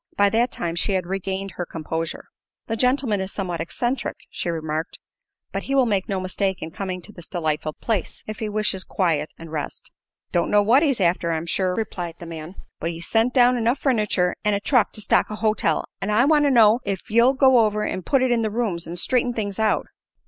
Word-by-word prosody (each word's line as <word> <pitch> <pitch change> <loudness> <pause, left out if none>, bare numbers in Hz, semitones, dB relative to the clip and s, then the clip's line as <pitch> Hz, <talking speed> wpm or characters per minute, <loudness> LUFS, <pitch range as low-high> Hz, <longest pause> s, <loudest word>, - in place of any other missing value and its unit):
By 200 0 +4
that 235 +2 +2
time 170 -1 -3
she 195 +4 0
had 185 -2 0
regained 195 +1 -3
her 175 - -1
composure. 160 0 -4 0.4
"The 225 - -2
gentleman 250 -4 +2
is 190 0 -3
somewhat 175 -4 -3
eccentric," 240 +10 -2
she - - -3
remarked; 160 -1 -3 0.5
"but - - -2
he 275 - +1
will 265 -2 +5
make 200 -4 0
no 195 -1 0
mistake 185 0 -2
in 160 - -6
coming 185 0 -5
to 210 - -8
this 175 -4 -11
delightful 155 -3 -2
place, 215 -1 -3
if 215 0 -6
he 220 - -2
wishes 210 -3 0
quiet 160 -5 0
and 165 -1 -10
rest." 150 -3 -4 0.4
"Don't 170 -1 +1
know 205 0 +4
what 240 +7 +5
he's 280 -7 +2
after, 170 -2 +1
I'm 160 0 -2
sure," 180 +1 0
replied 175 -6 -4
the 175 - -9
man. 165 +2 -8 0.2
"But 165 - -2
he's 170 0 -5
sent 225 +5 +2
down 250 -1 +5
enough 235 +3 +1
furniture 210 -9 +1
an' 210 -1 +2
truck 250 -6 +3
to 215 - -3
stock 205 - +2
a 215 - -4
hotel, 215 0 +1 0.2
an' 200 - -2
I 215 +4 +4
want 295 0 +4
to - - +4
know 230 -3 +6
ef 195 -3 -4
you'll 235 +4 +5
go 260 -2 +5
over 210 -1 +2
an' 185 - -3
put 260 +8 +2
it 255 - +2
in 235 -1 +2
the 220 - 0
rooms, 210 -6 -1
an' 170 - -5
straighten 245 +6 +1
things 205 -2 -3
out." 220 -1 +2
200 Hz, 220 wpm, -23 LUFS, 175-230 Hz, 0.5 s, know